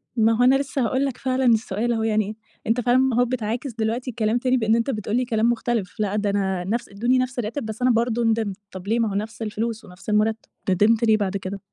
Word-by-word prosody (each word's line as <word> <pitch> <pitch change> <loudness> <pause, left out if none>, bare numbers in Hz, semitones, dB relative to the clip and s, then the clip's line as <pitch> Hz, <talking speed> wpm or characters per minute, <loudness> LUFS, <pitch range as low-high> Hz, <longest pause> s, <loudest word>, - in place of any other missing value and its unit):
ما 225 0 +4
هو 245 - +3
أنا 255 +2 +6
لسّه 275 0 -1
هاقول 260 +4 +1
لك 270 -3 -3
فعلًا 260 0 0
السؤال 225 0 +2
أهو 225 -1 -1
يعني، 215 -1 0 0.3
أنت 235 +2 +2
فعلًا 245 +1 +3
ما 260 -2 +2
أهو 245 - +4
بتعاكس 240 +1 -3
دلوقتي 230 +3 -2
الكلام 225 0 0
تاني 255 +1 +1
بإن 220 -2 +2
أنت 230 +3 0
بتقول 215 -2 -2
لي 250 - +1
كلام 230 -1 +1
مُختلف، 235 -3 -2
لأ 210 -1 0
ده 210 -1 0
أنا 190 -2 0
نَفْس 225 +6 -2
ادوني 240 +6 +1
نَفْس 255 0 -1
الراتب 235 +3 -3
بس 220 +2 -6
أنا 255 - +4
برضه 235 0 +1
ندمت، 220 -4 0
طَب 190 +1 -9
ليه 230 +2 +1
ما 225 -2 +1
هو - - -4
نَفْس 220 +3 -4
الفلوس 220 +1 -3
ونفْس 180 +2 -11
المرتب، 215 +1 +2 0.3
ندمت 215 +5 +3
ليه 220 -1 +5
بعد 200 -1 -1
كده؟ 195 +1 -6
225 Hz, 240 wpm, -23 LUFS, 210-245 Hz, 0.3 s, أنا